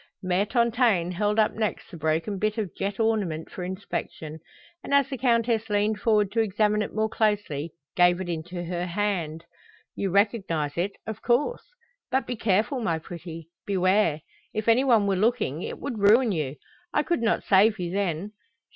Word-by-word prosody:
Mère 185 +3 +1
Tontaine 235 -7 +2
held 205 +4 0
up 215 -1 +3
next 215 -2 -3
the - - -8
broken 160 +6 -1
bit 215 +2 0
of 205 -6 -3
jet 195 +1 -3
ornament 205 -8 0
for 180 - -6
inspection, 180 -4 -5 0.4
and 280 - 0
as 280 -2 +4
the 270 - -3
Countess 230 -3 +1
leaned 210 +1 +1
forward 210 -2 +2
to 225 - 0
examine 210 0 +2
it 210 - -3
more 220 0 +1
closely, 205 -9 -1 0.2
gave 175 0 +4
it 185 - -4
into 175 +1 -4
her 175 +1 -3
hand. 170 -4 -2 0.5
"You 195 - -1
recognize 190 -7 +1
it, 185 +4 -1
of 220 -2 -6
course. 255 - +1 0.4
But 265 +1 +1
be 245 - -3
careful, 220 +4 +1
my 170 -9 0
pretty! 165 0 -9 0.2
Beware! 185 -4 +2 0.3
If 215 +1 -2
any 230 +3 +5
one 230 -6 +4
were 200 -1 +1
looking, 190 - 0
it - - -5
would 255 -6 -5
ruin 220 +4 +5
you. 150 -6 -2 0.4
I 295 - +2
could 340 -5 0
not 230 -1 +1
save 210 +3 +4
you 175 -1 -3
then. 195 0 -2
205 Hz, 175 wpm, -26 LUFS, 175-220 Hz, 0.5 s, any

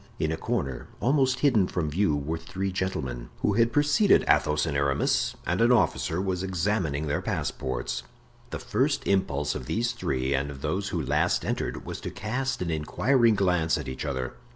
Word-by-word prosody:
In 80 0 0
a - - 0
corner, 80 - -3
almost 130 0 +2
hidden 115 -10 +4
from 85 -4 -2
view, 95 -1 +2
were 75 +3 -3
three 95 +3 -4
gentlemen, 65 -11 -3
who - - +2
had 115 +2 +3
preceded 145 - +4
Athos 75 0 +3
and 70 - -2
Aramis, 70 -1 +1
and - - 0
an 120 +1 +5
officer 95 -7 +2
was 95 -1 -1
examining 90 -5 -1
their 75 0 -1
passports. 60 -1 -3 0.5
The - - -4
first - - 0
impulse 95 -7 +1
of - - -6
these 120 +2 0
three, 65 - -1
and 70 +1 0
of 70 -2 -9
those 95 +6 -1
who 85 - -2
last 75 +6 +1
entered, - - -3
was - - -6
to - - -4
cast 125 +2 -2
an 85 - -2
inquiring 115 - +2
glance 90 -5 +2
at - - -6
each 65 - -5
other. 65 -1 -3
90 Hz, 180 wpm, -27 LUFS, 70-110 Hz, 0.5 s, an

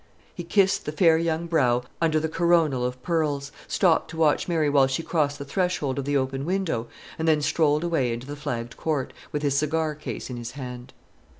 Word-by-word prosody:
He 175 - -6
kissed 195 +2 +2
the - - -1
fair 160 0 +4
young 165 0 -1
brow 125 -7 +2 0.2
under 160 -2 +3
the 160 - -1
coronal 160 -5 +2
of 125 0 -3
pearls, 150 -4 -1 0.2
stopped 175 -5 +2
to 165 - -8
watch 155 -2 +2
Mary 165 -4 +1
while 140 -2 +4
she 135 +5 -2
crossed 150 -4 0
the 140 - -7
threshold 155 -5 -1
of 135 - -3
the 145 0 +1
open 135 0 -2
window, 170 -9 -1 0.3
and 160 - -1
then 155 -2 +4
strolled 150 0 +2
away 160 -8 +1
into 120 +2 -5
the 145 +1 -6
flagged 120 -4 -5
court, 150 -5 -2 0.2
with 150 0 -3
his 140 -2 +1
cigar 155 +2 0
case 150 +1 -6
in 125 - -5
his 120 0 -6
hand. 125 -2 -8
150 Hz, 205 wpm, -25 LUFS, 135-165 Hz, 0.3 s, fair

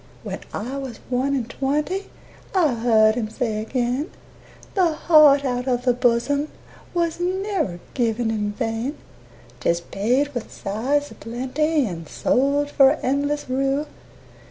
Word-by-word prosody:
When - - -5
I 255 +6 -4
was 265 -4 -6
one 265 +3 +1
and 245 -4 -2
twenty 295 +9 -2 0.5
I 325 -8 +4
heard 225 -2 +4
him 220 -3 -2
say 220 -2 -2
again, 250 +6 -1 0.6
"The 360 -5 +3
heart 300 -3 +6
out 250 0 -1
of 250 -1 0
the 250 - +4
bosom 250 +4 +1 0.5
Was 340 -1 0
never 365 - -1
given 230 -2 0
in 210 -1 -1
vain; 230 +5 -2 0.6
'Tis 170 0 +1
paid 245 +11 0
with 240 -3 -5
sighs 270 +9 -1
a - - -9
plenty 265 +6 -1
And 165 -6 -6
sold 285 +2 +1
for 275 -1 +6
endless 285 +2 0
rue." 270 +3 0
260 Hz, 135 wpm, -23 LUFS, 230-290 Hz, 0.6 s, heart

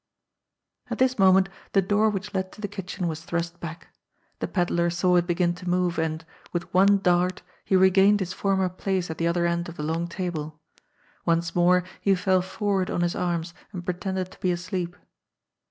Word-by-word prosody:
At - - -3
this 255 -2 +2
moment 190 0 +6 0.3
the 195 - +5
door 210 +3 +3
which 205 0 -4
led 190 -1 -2
to 210 - -12
the 205 - -2
kitchen 190 -2 -4
was 160 -1 -4
thrust 170 0 -3
back. 165 0 -8 0.5
The - - -2
pedlar 175 -2 +1
saw 180 +1 +2
it 175 0 +2
begin 175 0 +1
to 180 +1 -6
move, 180 -2 +1
and, 160 0 -2 0.3
with 175 -1 -4
one 200 +2 +6
dart, 180 -1 +1 0.2
he 190 - +1
regained 190 +2 +5
his 190 -1 -3
former 190 -1 +1
place 185 -1 -2
at 160 - -7
the 165 - +1
other 170 0 +1
end 170 0 -1
of 170 - -10
the 150 - -4
long 165 +2 -1
table. 165 -4 -4 0.6
Once 170 0 +1
more 180 +1 +4 0.2
he 195 -1 +3
fell 185 0 +2
forward 190 0 -1
on - - -1
his 175 0 +1
arms 170 -1 -2 0.2
and 180 -2 -6
pretended 185 0 -3
to - - -16
be 185 - 0
asleep. 175 0 -3
180 Hz, 190 wpm, -25 LUFS, 170-190 Hz, 0.6 s, moment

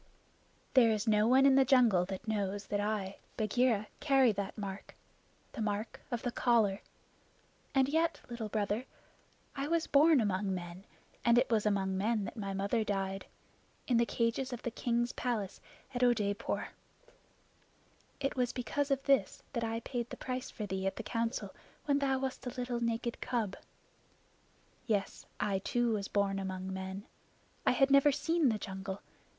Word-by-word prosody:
"There 245 -4 +6
is 215 0 0
no 210 0 +4
one 260 +3 +6
in 275 - +7
the 270 0 +6
jungle 240 -9 +4
that 195 +4 -6
knows 205 -2 -1
that 205 - 0
I, 205 -2 -2 0.2
Bagheera, 220 0 +2
carry 270 -4 +4
that 200 +1 -4
mark 200 -2 -6 0.6
the 240 - -6
mark 215 +1 -2
of 240 -2 -3
the 245 - -1
collar; 220 -5 +2 0.9
and 265 -1 +4
yet, 325 +3 +1
Little 235 -3 -5
Brother, 210 +3 -1 0.7
I 275 +1 -2
was 330 +1 +1
born 295 +1 +5
among 195 -2 0
men, 175 +2 -7 0.4
and 235 0 +5
it 245 0 +3
was 215 -2 +2
among 190 -2 0
men 215 +1 +1
that - - -7
my 200 -3 -4
mother 200 +4 0
died 195 -2 -2 0.6
in 245 - +2
the 235 - +4
cages 235 +3 0
of 245 -1 -6
the 240 - -2
king's 240 +1 0
palace 225 -6 -3 0.3
at 245 - -2
Oodeypore. 215 -5 +1 1.5
It 275 - -1
was 250 -2 0
because 280 +3 -1
of 275 -1 +1
this 270 -9 +2
that 235 -3 -1
I 225 0 -2
paid 240 0 -4
the - - -7
price 255 0 -4
for 215 - -5
thee 190 -1 -2
at 195 - -1
the 230 - -5
Council 230 +1 -2 0.3
when 285 -1 +2
thou 270 -1 +1
wast 265 -1 -4
a - - 0
little 245 -1 -3
naked 235 +1 -2
cub. 225 -6 -1 1.3
Yes, 205 -4 -1
I 200 -2 0
too 240 +3 0
was 200 -2 -2
born 200 -1 0
among 190 0 -4
men. 190 +1 -5 0.6
I - - +7
had 270 0 +3
never 275 +1 +6
seen 325 0 +2
the 220 - 0
jungle. 190 0 -6
225 Hz, 165 wpm, -33 LUFS, 200-250 Hz, 1.5 s, in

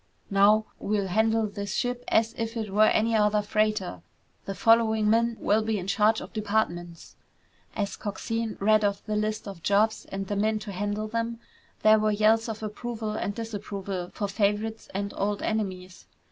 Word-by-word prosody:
"Now, 205 +2 +5
we'll 200 -2 -1
handle 220 +3 +2
this 200 -1 -4
ship 245 0 -1
as 225 +1 +2
if 230 0 -3
it 215 -3 -3
were 215 +1 +6
any 225 +1 +2
other 210 -1 +3
freighter. 215 -2 0 0.4
The 195 - -4
following 220 +1 +4
men 230 0 +2
will 215 +2 +2
be 220 0 -1
in 185 - -4
charge 210 +3 +2
of - - -10
departments!" 200 -6 -2 0.6
As 205 -2 -2
Coxine 225 +2 -3
read 215 +1 +4
off 200 -1 -1
the 215 - -2
list 215 0 -2
of 195 -4 -8
jobs 210 +5 +2
and 195 0 -5
the 205 - -3
men 215 +2 +1
to 215 -1 -7
handle 205 +3 -2
them, 230 +1 -3 0.4
there 215 0 +6
were 215 0 +2
yells 220 +2 +3
of 220 0 -5
approval 220 +1 -4
and 205 -1 -3
disapproval 200 -5 -5
for 205 - -3
favorites 210 +2 -1
and 200 +1 -3
old 205 +1 -1
enemies. 185 -4 -3
215 Hz, 175 wpm, -27 LUFS, 200-220 Hz, 0.6 s, were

